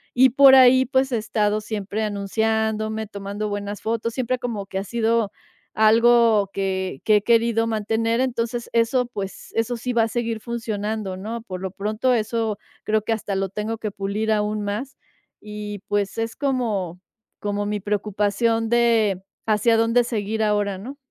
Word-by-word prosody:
y 260 +2 +6
por 270 +1 +7
ahí, 260 0 +7
pues, 265 0 +1
he 240 - +1
estado 215 -1 0
siempre 210 0 -3
anunciándome, 220 +1 -1
tomando 200 +1 -5
buenas 205 0 -4
fotos, 230 +1 -2
siempre 255 0 -1
como 225 -5 -4
que 190 - -5
ha - - -3
sido 230 0 0 0.4
algo 225 -1 +5
que 190 -5 -2
que 215 - +5
he 205 - -2
querido 230 0 +3
mantener. 225 +1 0
Entonces 235 -2 -2
eso, 235 +2 +2
pues, 200 -5 -7
eso 225 +2 0
sí 250 +2 -3
va 230 -1 +3
a - - +1
seguir 230 -1 -2
funcionando, 215 -4 -3
¿no? 225 +5 -5
Por 185 -5 -7
lo 190 -1 -4
pronto, 215 +6 0
eso 220 -2 -1 0.2
creo 215 0 +1
que 225 - -2
hasta 205 -2 -3
lo 195 0 -1
tengo 210 +4 -3
que 215 - -3
pulir 200 +3 -2
aún 210 0 0
más 210 +7 -4 0.4
y, 210 -1 -6
pues, 205 -1 -1
es 225 0 -2
como 220 - -1 0.4
como 205 0 -2
mi 210 0 -2
preocupación 210 +3 0
de, 225 -5 +2 0.2
¿hacia 220 +2 +3
dónde 230 +2 +3
seguir 220 -1 -2
ahora, 205 -2 +1
no? 245 +9 -8
220 Hz, 165 wpm, -23 LUFS, 205-230 Hz, 0.4 s, por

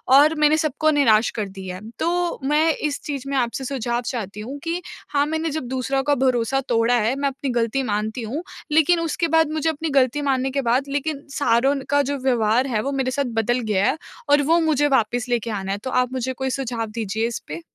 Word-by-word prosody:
और 300 +3 +6
मैंने 305 +1 +4
सब 310 -4 0
को 310 0 +4
निराश 235 -7 +4
कर 205 - -1
दिया 190 -1 -7
है। 215 +4 -9
तो 350 +1 0
मैं 310 +2 +3
इस 295 -2 -2
चीज़ 280 -3 -4
में 275 - 0
आपसे 245 +2 -1
सुझाव 245 -2 -2
चाहती 210 -4 -4
हूँ 260 +7 -6
कि 340 +2 -2 0.3
हाँ, 285 0 +2
मैंने 320 +1 -1
जब 310 -1 -3
दूसरों 265 +1 -1
का 290 0 +2
भरोसा 255 +2 +1
तोड़ा 235 +1 +3
है 225 +5 +1
मैं 280 0 0
अपनी 270 0 -5
गलती 240 +3 0
मानती 215 +3 -2
हूँ 270 +10 -4 0.3
लेकिन 320 +2 +4
उसके 335 0 -1
बाद 320 -1 +3
मुझे 315 +1 0
अपनी 320 +1 -3
गलती 260 +3 +1
मानने 265 -1 0
के 275 0 0
बाद 270 +3 +1
लेकिन 285 0 -2 0.2
सारों 270 +2 +3
का 285 0 +4
जो 285 - -1
व्यवहार 240 0 +2
है 220 -4 0
वो 275 - -2
मेरे 265 -2 -1
साथ 280 +1 0
बदल 240 +3 +1
गया 210 - 0
है 310 - +1 0.3
और 290 0 +5
वो 330 +4 +3
मुझे 295 -3 +2
वापस 245 -2 +1
लेके 235 -1 0
आना 195 -2 -3
है। 200 - -1
तो 260 - -3
आप 250 +1 -3
मुझे 260 0 -2
कोई 265 0 -3
सुझाव 245 -4 -2
दीजिए 220 0 -2
इसपे? 170 -8 -6
265 Hz, 225 wpm, -22 LUFS, 235-290 Hz, 0.3 s, और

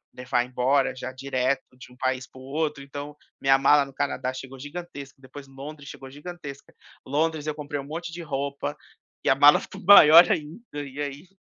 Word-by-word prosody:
levar 125 -1 -1
embora 130 +2 +1
já 130 0 -6
direto 130 0 -1 0.2
de 125 - -13
um 125 - -18
país 130 0 -1
para 130 - -16
o - - -12
outro 150 0 -2
então, 145 +1 -8 0.3
minha 135 0 +5
mala 140 +2 +5
no 135 - -14
Canadá 130 -2 -2
chegou 130 +1 -9
gigantesca, 145 -1 -8
depois 135 +2 -12
Londres 140 +2 -10
chegou 135 -1 -10
gigantesca. 145 -1 -10 0.3
Londres 155 +2 -1
eu 155 - -2
comprei 145 -1 -5
um - - -10
monte 165 +3 -6
de 175 - -7
roupa, 140 -1 -4 0.5
e - - +1
a 135 - +5
mala 145 +2 +7
ficou - - -10
maior 170 -3 +10
ainda 165 +5 -3 0.2
e 140 +1 -7
aí, 145 +4 -6
140 Hz, 190 wpm, -25 LUFS, 135-150 Hz, 0.5 s, maior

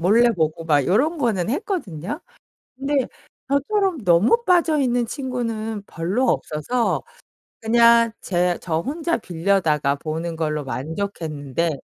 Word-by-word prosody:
몰래 230 +7 +5
보고 160 -4 -1
막 145 -4 +3
요런 290 - +2
거는 220 -8 0
했거든요. 270 - -3 0.6
근데 275 -1 0 0.4
저처럼 320 - 0
너무 200 - +4
빠져 345 -4 +3
있는 245 -2 +1
친구는 225 -5 -3
별로 185 +11 -1
없어서 230 +5 0 0.6
그냥 230 0 +5
제 180 -1 0
저 160 -2 -1
혼자 320 - -1
빌려다가 165 -7 +1
보는 160 +2 -4
걸로 150 -2 -1
만족했는데 155 +1 -3
210 Hz, 260 characters per minute, -22 LUFS, 165-260 Hz, 0.6 s, 몰래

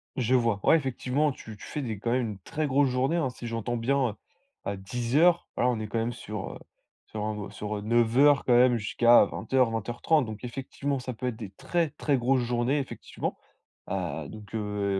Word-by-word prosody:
Je 125 0 +1
vois, 115 -4 +2
ouais - - +6
effectivement, 135 +1 0
tu 110 -4 -10
tu - - -14
fais 150 - -4
des 110 -5 -4
quand 115 +2 -1
même 125 -3 +1
une 100 - -9
très 155 +11 -3
grosse 140 0 +3
journée, 130 +7 +1
hein. 150 -6 +1
Si 120 0 -9
j'entends 115 +1 -2
bien, 125 -2 +1 0.5
heu, 100 -1 -2
10 120 +6 -3
heures, 175 +2 +4
voilà, 125 - +2
on 115 -3 -1
est 110 - -4
quand 115 +2 -2
même 120 +2 -1
sur, 105 -4 -6
heu, - - -9 0.5
sur 105 -1 -5
un 105 -2 -4
sur, 105 0 -4
heu, - - -5
9:00 120 +6 +4
quand 125 - +3
même 125 -1 +5
jusqu'à 120 +2 +5
20:00-20:30. 120 +4 +1
Donc 110 +2 -8
effectivement, 135 +2 -3
ça 125 0 -5
peut 125 +3 -4
être 120 - -2
des 105 -4 -8
très, 165 - -1
très 140 -3 0
grosses 125 +1 +2
journées, 120 +4 +1
effectivement. 135 - -5 0.5
Heu, - - -3
donc, 105 0 -10
heu, 105 -2 -1
120 Hz, 205 wpm, -28 LUFS, 110-135 Hz, 0.5 s, ouais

